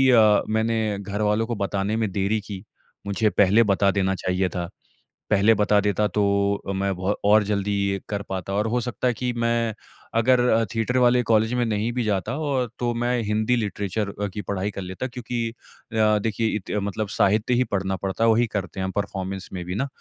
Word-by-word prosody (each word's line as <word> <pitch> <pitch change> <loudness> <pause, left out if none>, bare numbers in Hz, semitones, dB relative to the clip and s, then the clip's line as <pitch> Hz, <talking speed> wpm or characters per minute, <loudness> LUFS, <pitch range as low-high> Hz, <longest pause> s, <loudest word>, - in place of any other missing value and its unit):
अ 110 -2 +5
मैंने 110 -1 0
घरवालों 105 +2 0
को 120 - -2
बताने 100 +1 -1
में 110 -4 -1
देरी 100 +3 0
की। 100 -2 -8 0.4
मुझे 105 +2 +1
पहले 105 +2 +4
बता 100 -1 +2
देना 95 -1 0
चाहिए 90 0 -1
था। 85 0 -4 0.6
पहले 105 +2 +5
बता 105 -1 +3
देता 105 +1 +1
तो 100 +2 0 0.4
अ 100 - 0
मैं 95 0 -1
बहो 95 +3 0
और 105 +1 +5
जल्दी 100 0 -1 0.2
ये 100 0 -2
कर 100 -1 -3
पाता 95 0 -4
और 105 +2 +1
हो 120 +2 0
सकता 125 +1 -1
है 120 - +1
कि 125 +1 -2
मैं 115 -1 0 0.4
अगर 125 +2 +4
अ 115 +1 +3
थिएटर 120 +3 0
वाले 125 0 +4
कॉलेज 110 0 +2
में 125 -1 +1
नहीं 110 +1 -1
भी 125 0 -1
जाता 105 +4 -1
और 140 -5 -1
तो 120 -1 0
मैं 120 +1 0
हिंदी 110 +3 +1
लिटरेचर 100 -1 -2
अ - - +1
की 105 - -4
पढ़ाई 100 +1 -2
कर - - -6
लेता। 95 +7 -5
क्योंकि 120 -2 -3
अ 110 -2 -1
देखिए 115 0 0
इते 105 +1 -3
मतलब 100 +1 -3
साहित्य 105 +5 +3
ही 125 +1 +3
पढ़ना 95 -1 0
पड़ता 95 +4 -2
है 115 - +5
वही 115 +2 +3
करते 100 -2 -4
हैं 95 - -1
हम 95 - -2
परफॉर्मेंस 95 -1 -3
में 90 -2 -5
भी 90 +1 -4
न। 135 +6 0
105 Hz, 205 wpm, -24 LUFS, 100-115 Hz, 0.6 s, अ